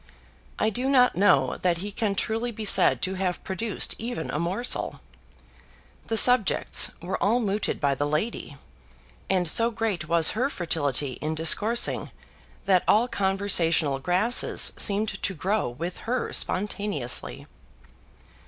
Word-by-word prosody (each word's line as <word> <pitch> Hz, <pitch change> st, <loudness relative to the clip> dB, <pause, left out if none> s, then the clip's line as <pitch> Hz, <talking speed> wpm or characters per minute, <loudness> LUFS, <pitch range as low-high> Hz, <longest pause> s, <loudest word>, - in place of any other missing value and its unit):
I 215 Hz, -, 0 dB
do 250 Hz, +5 st, -2 dB
not 250 Hz, -6 st, +3 dB
know 140 Hz, -9 st, +2 dB
that 175 Hz, -2 st, +1 dB
he 200 Hz, +4 st, -6 dB
can 205 Hz, -1 st, -2 dB
truly 225 Hz, +4 st, -2 dB
be 220 Hz, -2 st, -6 dB
said -, -, +3 dB
to 190 Hz, -, -1 dB
have 185 Hz, -2 st, -3 dB
produced 205 Hz, +2 st, -3 dB
even 230 Hz, -7 st, -5 dB
a 150 Hz, -, -3 dB
morsel. 185 Hz, +9 st, -3 dB, 1.1 s
The 225 Hz, -, -1 dB
subjects 245 Hz, -4 st, +4 dB
were 180 Hz, +2 st, -4 dB
all 230 Hz, +5 st, +2 dB
mooted 210 Hz, -2 st, -2 dB
by 140 Hz, -1 st, +1 dB
the 145 Hz, +2 st, -2 dB
lady, 155 Hz, -1 st, -3 dB, 0.7 s
and 180 Hz, -2 st, +1 dB
so 230 Hz, +9 st, +4 dB
great 215 Hz, -9 st, -3 dB
was 165 Hz, -1 st, +3 dB
her 255 Hz, +5 st, -1 dB
fertility 145 Hz, -, -2 dB
in 155 Hz, +1 st, -3 dB
discoursing 210 Hz, +9 st, +2 dB, 0.6 s
that 185 Hz, -2 st, +3 dB
all 225 Hz, +4 st, +3 dB
conversational 180 Hz, -, 0 dB
grasses 185 Hz, -, +2 dB
seemed 210 Hz, +1 st, 0 dB
to 195 Hz, -, -3 dB
grow 195 Hz, -, -1 dB
with 165 Hz, +9 st, -6 dB
her 250 Hz, 0 st, -2 dB
spontaneously. 190 Hz, -, -2 dB
195 Hz, 135 wpm, -25 LUFS, 165-220 Hz, 1.1 s, subjects